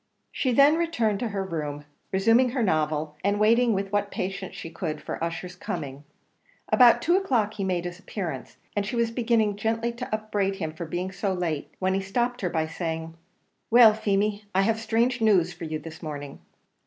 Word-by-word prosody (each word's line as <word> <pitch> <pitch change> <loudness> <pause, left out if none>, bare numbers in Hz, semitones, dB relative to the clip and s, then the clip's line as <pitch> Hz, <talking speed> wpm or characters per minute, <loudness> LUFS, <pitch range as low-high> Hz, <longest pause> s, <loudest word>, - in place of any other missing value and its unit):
She 260 - 0
then 280 +5 +6
returned 240 -12 0
to 240 - -1
her 200 -2 -2
room, 150 -5 -4 0.3
resuming 225 +6 +4
her 245 -1 -1
novel, 155 -4 0
and 200 +1 +1
waiting 230 +2 +4
with 195 0 -2
what 205 0 +1
patience 190 0 -4
she 165 - -7
could 160 -2 -4
for - - -5
Ussher's 175 +2 -4
coming. 145 -6 -6 0.6
About 245 -2 +6
two 345 +2 +3
o'clock 245 - +1
he 205 - -4
made 180 -2 -1
his 175 0 -6
appearance, 185 -4 -6 0.2
and 205 - +1
she 210 +4 -4
was 235 -1 +1
beginning 225 -3 +1
gently 225 +2 -1
to 235 +2 -7
upbraid 210 -2 -1
him 160 -5 -4
for 170 +2 -6
being 180 +3 -3
so 195 +1 -2
late, 165 -5 -3
when 190 0 0
he 195 - 0
stopped 240 +6 -1
her, 180 - 0
by 160 -2 0
saying, 160 0 -4 0.6
"Well, 230 -2 +8
Feemy, 210 0 0
I 190 - +4
have 225 +2 +1
strange 230 +2 +1
news 185 -6 +3
for 170 0 -7
you 155 0 -3
this 160 +1 -10
morning." 145 -3 -6
195 Hz, 190 wpm, -26 LUFS, 170-225 Hz, 0.6 s, Well